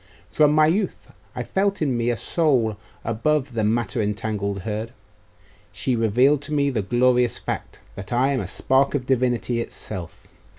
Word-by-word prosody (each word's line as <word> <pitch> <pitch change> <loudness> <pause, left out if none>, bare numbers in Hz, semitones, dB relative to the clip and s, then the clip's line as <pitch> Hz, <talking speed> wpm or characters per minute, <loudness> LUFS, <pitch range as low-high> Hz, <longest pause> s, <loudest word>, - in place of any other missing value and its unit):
From 150 -1 +4
my 155 0 +5
youth 185 +5 -1 0.2
I - - -3
felt 200 +1 0
in 140 -5 0
me 120 0 0
a 120 - 0
soul 130 -11 +1 0.3
above 130 +4 0
the 110 -2 -1
matter 115 +2 0
entangled 105 -1 -2
herd. 110 +3 -4 0.8
She 130 - -1
revealed 125 +6 +3
to 150 +1 -6
me 140 -1 +2
the 115 -5 0
glorious 120 +3 +2
fact, - - -6
that 95 - -8
I 130 +3 +2
am 135 - 0
a - - -4
spark 135 +2 +2
of 130 -3 -2
Divinity 125 -2 +1
itself. 100 -3 -8
120 Hz, 165 wpm, -23 LUFS, 110-140 Hz, 0.8 s, my